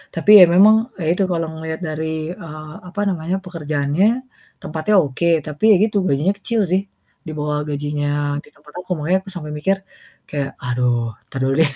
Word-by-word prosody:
Tapi 165 +5 -2
ya - - +12
memang 210 +4 +7 0.2
ya 165 - -4
itu 195 - 0
kalau 165 -1 0
ngelihat 160 +1 -5
dari, 160 +1 -3
eee, 155 -3 -9 0.2
apa 205 +3 -7
namanya, 175 +1 -2
pekerjaannya, 155 0 -1 0.6
tempatnya 160 +7 -1
oke, 165 +1 +1 0.2
tapi 150 +5 -8
ya - - +7
gitu, 210 -2 -2
gajinya 150 +8 +2
kecil 225 +3 -2
sih. 185 +2 +1 0.5
Di - - -4
bawah 150 0 -1
gajinya 145 0 -2 0.4
di - - -18
tempat 150 0 -19
aku, - - -23
makanya 170 +5 +1
aku 195 - -12
sampai 150 -3 -6
mikir 190 +6 0 0.5
kayak, 140 -2 -2 0.2
"Aduh, 120 -2 0
entar 135 - -7
dulu 135 0 +1
deh." 145 -3 +3
155 Hz, 180 wpm, -20 LUFS, 145-180 Hz, 0.6 s, ya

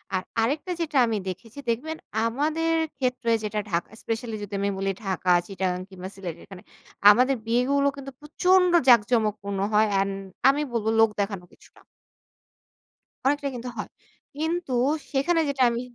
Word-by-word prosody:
আর 185 - -1 0.2
আরেকটা 295 +10 -1
যেটা 305 -3 -1
আমি 220 -2 0
দেখেছি। 225 +8 -8
দেখবেন 305 +8 -2 0.3
আমাদের 310 +7 0 0.2
ক্ষেত্রে 250 -3 -1
যেটা 210 0 -2
ঢাকা 170 -2 -1
স্পেশালই 225 -1 -3
যদি 205 0 -8
আমি 200 - 0
বলি 195 0 0
ঢাকা, 185 -1 0 0.2
চিটাগাং 185 -2 -2
কিংবা 190 0 -8
সিলেট 180 -4 -6
এখানে, 190 -2 -12 0.5
আমাদের 255 +5 +3
বিয়েগুলো 265 +5 +2
কিন্তু 275 -1 -8
প্রচন্ড 360 +4 +3 0.2
জাঁকজমকপূর্ণ 210 -4 +3
হয়। 215 +1 +4
অ্যান্ড 195 0 +1 0.4
আমি 285 +2 +2
বলব 225 -2 -2
লোক 225 -1 +6
দেখানো 200 -3 -3
কিছুটা - - -21 1.4
অনেকটা 285 +1 +1
কিন্তু 245 +1 -6
হয়। 210 - -5 0.5
কিন্তু, 320 -3 -2 0.4
সেখানে 310 +5 +2
যেটা 270 -2 +1
আমি 235 +1 -2
235 Hz, 145 wpm, -25 LUFS, 200-280 Hz, 1.4 s, লোক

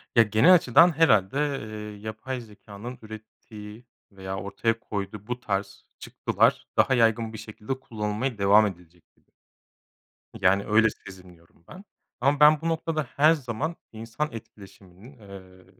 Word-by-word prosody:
Ya, 115 - +7
genel 110 - +5
açıdan 170 0 +5
herhâlde, 110 - +3
ııı, 110 -8 -4
yapay 110 +5 -6
zekânın 110 +2 -11
ürettiği 110 0 -12 0.3
veya 95 -1 -7
ortaya 100 +4 -2
koyduğu 105 -2 -6
bu 125 0 -4
tarz 100 -3 -4
çıktılar - - 0
daha 135 - +4
yaygın 115 -2 +2
bir - - -7
şekilde 110 +4 -7
kullanılmaya 110 +1 -4
devam 100 +2 +5
edilecek 90 -2 -12
gibi - - -37 1.1
yani, 95 +2 +3
öyle 110 +1 +4
sezinliyorum 90 -4 -16
ben 190 - -12 0.4
ama 140 +1 +2
ben 150 0 +6
bu 165 - -1
noktada 160 -1 -2
her 155 +3 +5
zaman 145 +3 -4 0.2
insan 115 +7 -4
etkileşiminin, 100 +2 -14
ııı, 95 -3 -14
110 Hz, 135 wpm, -25 LUFS, 100-130 Hz, 1.1 s, Ya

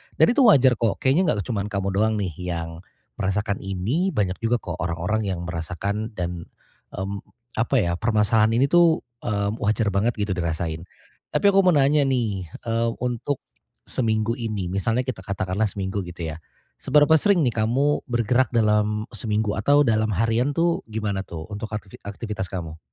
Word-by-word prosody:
dan - - +6
itu 265 - +1
wajar 130 - +5
kok. 115 -4 +1
Kayaknya 140 - +3
enggak 100 - -2
cuma 110 -5 -1
kamu 100 -2 -2
doang 110 +3 +1
nih 95 -4 -2 0.2
yang 85 0 -6 0.4
merasakan 100 +1 -1
ini. 115 - -1
Banyak 95 -3 0
juga 115 +2 +1
kok 85 -2 -5
orang-orang 90 +5 -1
yang 90 -2 -3
merasakan 100 +6 -4
dan, 85 -1 -4 0.5
mmm, 100 +1 -4 0.4
apa 125 +4 +1
ya, 85 - 0
permasalahan 110 0 +3
ini 135 +3 +2
tuh, 170 -2 +5 0.2
mmm, 100 +1 -1
wajar 105 0 +1
banget 105 +5 +1
gitu 105 -2 -2
dirasain. 85 -1 -3 0.4
Tapi - - 0
aku 195 - +4
mau 175 - +5
nanya 140 0 +4
nih, 110 -8 -1 0.2
eee, 115 0 0
untuk 125 +3 -2 0.4
seminggu 115 - -1
ini, 105 -6 -3
misalnya 110 +6 0
kita 120 -7 -6
katakanlah 100 +2 -1
seminggu 95 -1 -3
gitu 85 -2 -6
ya. 75 - -7 0.4
Seberapa 150 +2 +4
sering 200 -1 +3
nih 120 - +2
kamu 140 +6 +1
bergerak 120 0 +1
dalam 105 -1 +1
seminggu 105 -1 -1
atau 145 +7 +4
dalam 110 -4 +2
harian 115 +7 +1
tuh 170 +2 +1
gimana 105 -3 -3
tuh 80 +3 -8
untuk 105 +2 -5
aktivi 105 -2 -6
aktivitas 105 -1 -4
kamu? 80 -4 -6
105 Hz, 165 wpm, -24 LUFS, 95-120 Hz, 0.5 s, dan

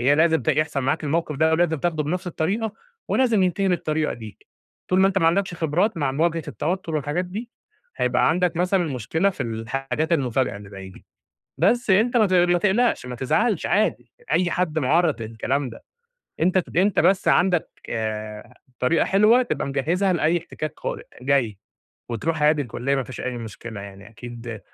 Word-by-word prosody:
هي 140 +4 +4
لازم 160 +1 +3
ت - - -4
يحصل 150 -1 +1
معاك 135 +4 -1
الموقف 155 0 -1
ده، 160 +2 +3
ولازم 165 -1 +2
تاخده 160 -2 0
بنفْس 180 +5 -3
الطريقة 200 +7 -1 0.4
ولازم 235 -6 +3
ينتهي 190 +2 +1
بالطريقة 155 -3 0
دي، 110 -3 -10 0.5
طول 185 +1 +3
ما 195 - +6
أنت 195 0 +1
ما 165 - +2
عندكش 180 +2 +1
خبرات 170 +7 0
مع 140 -5 0
مواجهة 165 +3 0
التوتر، 165 - -3
والحاجات 150 +4 -1
دي، 215 +7 -7 0.5
هيبقى - - +2
عندك 180 0 +1
مثلًا 180 +1 +2
مشكلة 160 - 0
في - - -5
الحاجات 135 +7 -3
المفاجئة 130 -6 +1
اللي 100 -1 -11
زي 95 -1 -9
دي. 95 - -15 0.5
بس 240 -2 +2
أنت 225 +6 +4
ما 220 - +5
تق 185 - +1
ما 175 - +4
تقلقش، 210 - +2
ما 125 - -6
تزعلش، 195 - +1
عادي 210 +2 0 0.2
أي 180 -1 +2
حد 165 -3 0
معرّض 155 0 +2
للكلام 125 +5 -2
ده، 115 - -12 0.6
أنت 185 +3 +3
أنت 190 +2 +3
بس 190 0 +3
عندك، 180 -2 +3 0.2
آآ، 110 +1 -4 0.2
طريقة 145 +7 +2
حلوة 215 +6 +4
تبقى 240 - -2
مجهزها 165 +8 0
لأي 170 0 +2
احتكاك 155 -2 -6
قادم - - -4 0.2
جاي، 125 -7 +1 0.5
وتروح 155 +7 -2
عادي 150 -1 +4
الكلِّية 130 +3 -2
ما 135 - 0
فيش 130 - -8
أي 125 -1 -3
مشكلة، 110 -1 -8
يعني 100 +1 -11
أكيد 115 -1 -8
160 Hz, 175 wpm, -23 LUFS, 130-185 Hz, 0.6 s, ما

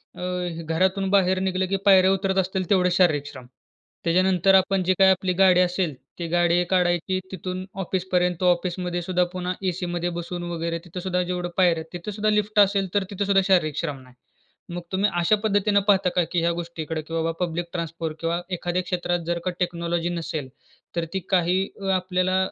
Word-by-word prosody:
अ, 180 -2 -4
घरातून 190 +4 +1
बाहेर 190 -1 +3
निघलं, 190 0 0
की 195 - 0
पायऱ्या 190 -1 +6
उतरत 195 0 0
असतील 190 -1 -2
तेवढेच 180 -2 +3
शारीरिक 155 -6 +3
श्रम. 130 -3 -10 0.6
त्याच्यानंतर 185 +2 +3
आपण 190 0 +3
जी 185 +1 +2
काही 190 0 +7
आपली 185 0 0
गाडी 185 -1 +5
असेल 180 -3 0 0.3
ती 170 - -3
गाडी 175 0 +3
काढायची, 180 0 +1
तिथून 185 0 -5
ऑफिसपर्यंत. 180 -1 -1
ऑफिसमध्ये 180 0 0
सुद्धा 180 +1 +1
पुन्हा 180 0 -2 0.2
एसीमध्ये 175 -1 -3
बसून 175 +1 -5
वगैरे 170 0 -2
तिथे 180 +1 -7
सुद्धा 180 -1 0
जेवढं 180 0 -3
पायऱ्या 180 -3 +5
आहेत. 160 - -5
तिथे 175 +4 -5
सुद्धा 215 +1 0
लिफ्ट 210 0 +1
असेल 200 -1 +4
तर 200 - +3
तिथे 200 +1 -2
सुद्धा 195 -1 +4
शारीरिक 155 -6 +2
श्रम 150 -5 -3
नाही. 125 -1 -18 0.6
मग 175 - -4
तुम्ही 195 +2 +2
अशा 175 +5 +4
पद्धतीने 205 -1 +2
पाहता 195 -2 +4
का? 180 - +3
की 175 - +1
ह्या 170 - +2
गोष्टीकडे 165 -2 -4
की 160 +2 -11
बाबा 165 0 0
पब्लिक 170 0 -4
ट्रान्सपोर्ट 165 -2 -4
किंवा 170 +1 -1 0.2
एखाद्या 175 +1 -1
क्षेत्रात 175 -1 -1
जर 170 0 0
का 185 - 0
टेक्नॉलॉजी 170 -1 -1
नसेल, 160 -5 -4 0.5
तर 170 -1 -1
ती 190 - 0
काही 180 0 +2 0.3
आपल्याला 185 0 0
180 Hz, 180 wpm, -24 LUFS, 170-190 Hz, 0.6 s, काही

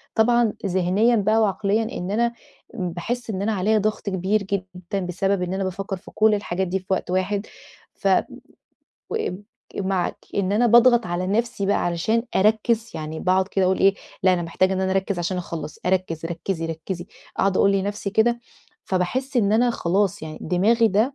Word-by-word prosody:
طبعًا 235 0 +3
ذِهنيًا 190 +5 +2
بقى 215 +1 +2
وعقليًا 205 +1 +1
إن 180 +2 -4
أنا 235 +2 +1 0.4
م 185 -6 -3
باحِس 230 +8 -4
إن 195 -2 -2
أنا 220 +2 0
عليا 210 +3 +2
ضَغْط 215 0 -1
كبير 195 +2 0
جدًا 190 -1 -4
بسبب 195 +2 0
إن 180 +1 -2
أنا 195 - -1
بافكّر 190 +1 -3
في - - -14
كل 220 0 +3
الحاجات 190 -2 -2
دي 190 +2 -1
في 185 - -20
وقت 190 -1 -1
واحد، 195 +3 0 0.5
ف - - -3 1.0
وآمم 205 - -3 0.3
ك - - -10
معاكِ 190 -2 -1 0.2
إن 200 -1 0
أنا 235 +4 +3
باضغط 240 -1 +6
على 175 +1 -2
نَفْسي 220 0 0
بقى 200 - +2
علشان 180 +7 +1
أركِّز، 220 +3 +2
يعني 155 0 -5
باقعُد 185 +1 +2
كده 195 -2 +1
أقول 185 +1 +2
إيه، 195 0 +5 0.3
لأ 185 - +5
أنا 175 -1 0
محتاجة 185 +3 +1
إن 190 - -1
أنا 190 - 0
أركِّز 195 -1 0
عشان 175 +2 -1
أخلَّص، 160 -4 -6
أركِّز، 180 -3 0
ركّزي، 170 0 -3
ركّزي، 170 +3 -5 0.3
أقعُد 195 -1 +2
أقول 200 - +4
لنفسي 200 +1 -2
كده، 235 +3 +2 0.4
فباحِس 250 +9 -1
إن 205 -3 +3
أنا 240 +3 +4
خلاص 200 -1 0
يعني 155 -1 -7
دماغي 220 +7 +3
ده 220 +7 +1
195 Hz, 180 wpm, -23 LUFS, 180-220 Hz, 1.0 s, باضغط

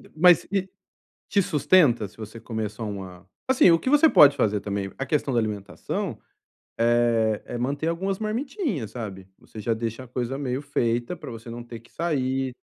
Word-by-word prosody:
Mas 175 +2 +5 0.8
te 200 - +3
sustenta 145 - +3
se - - -22
você 110 +1 -9
comer 110 -2 -4
só 110 +2 -7
uma 95 -3 -8 0.2
assim, 260 -8 +6
o 165 - +5
que 260 - -2
você 295 +2 +6
pode 145 - +7
fazer 105 -1 +1
também, 100 -1 -3
a 135 - -3
questão 140 -1 0
da - - +3
alimentação, 105 -3 -4 0.6
eh, 115 -2 +2
é - - -5
manter 140 +6 -2
algumas 190 +3 -2
marmitinhas, 220 - -3
sabe? 100 -6 -7
Você 110 - -11
já 115 +3 -1
deixa 115 +2 -3
a - - -16
coisa 125 +2 -3
meio 130 -2 -2
feita 120 0 -1
pra 150 - -9
você 115 0 -9
não 120 +1 -6
ter 120 -1 -9
que 115 - -23
sair, 135 -5 -1
e - - -15
120 Hz, 185 wpm, -25 LUFS, 110-155 Hz, 0.8 s, pode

